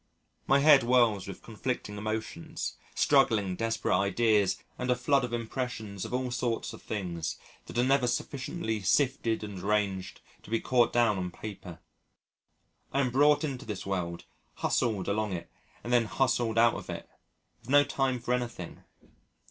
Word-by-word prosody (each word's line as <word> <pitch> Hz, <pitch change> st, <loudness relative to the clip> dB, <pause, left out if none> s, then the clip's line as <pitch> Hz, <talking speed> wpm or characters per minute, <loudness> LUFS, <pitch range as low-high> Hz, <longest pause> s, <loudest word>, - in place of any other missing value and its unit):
My 135 Hz, -, +5 dB
head 145 Hz, -2 st, +8 dB
whirls 120 Hz, -5 st, +3 dB
with -, -, -8 dB
conflicting 105 Hz, -, -4 dB
emotions, 110 Hz, -4 st, -4 dB, 0.2 s
struggling, 110 Hz, -10 st, +3 dB
desperate 115 Hz, -2 st, 0 dB
ideas, 100 Hz, 0 st, +2 dB, 0.2 s
and 125 Hz, -, -2 dB
a 125 Hz, -, +4 dB
flood 135 Hz, +2 st, +2 dB
of 125 Hz, -, -3 dB
impressions 115 Hz, -4 st, -4 dB
of -, -, -7 dB
all 125 Hz, 0 st, -1 dB
sorts 120 Hz, -2 st, -2 dB
of -, -, -11 dB
things 85 Hz, -6 st, -4 dB, 0.3 s
that -, -, -7 dB
are 120 Hz, -, +4 dB
never 135 Hz, -1 st, +3 dB
sufficiently 120 Hz, -1 st, -2 dB
sifted 115 Hz, +1 st, +1 dB
and 100 Hz, -3 st, -6 dB
arranged 100 Hz, -1 st, -1 dB, 0.2 s
to -, -, -15 dB
be 115 Hz, 0 st, +1 dB
caught 120 Hz, -2 st, +3 dB
down 115 Hz, -5 st, +3 dB
on 90 Hz, -1 st, -2 dB
paper. 95 Hz, -3 st, -8 dB, 1.1 s
I 135 Hz, -, 0 dB
am 130 Hz, -2 st, 0 dB
brought 145 Hz, +3 st, +4 dB
into 135 Hz, -5 st, -3 dB
this 105 Hz, -3 st, -5 dB
world, 90 Hz, -3 st, -3 dB, 0.3 s
hustled 105 Hz, -6 st, 0 dB
along 105 Hz, 0 st, 0 dB
it 85 Hz, -1 st, -6 dB, 0.3 s
and 120 Hz, -, -2 dB
then 120 Hz, -2 st, +4 dB
hustled 115 Hz, +1 st, 0 dB
out 115 Hz, 0 st, +6 dB
of -, -, -7 dB
it, -, -, -6 dB, 0.5 s
with -, -, -16 dB
no 145 Hz, +1 st, +7 dB
time 135 Hz, -2 st, 0 dB
for 120 Hz, -, -1 dB
anything. 120 Hz, -8 st, -4 dB
115 Hz, 160 wpm, -29 LUFS, 100-125 Hz, 1.1 s, head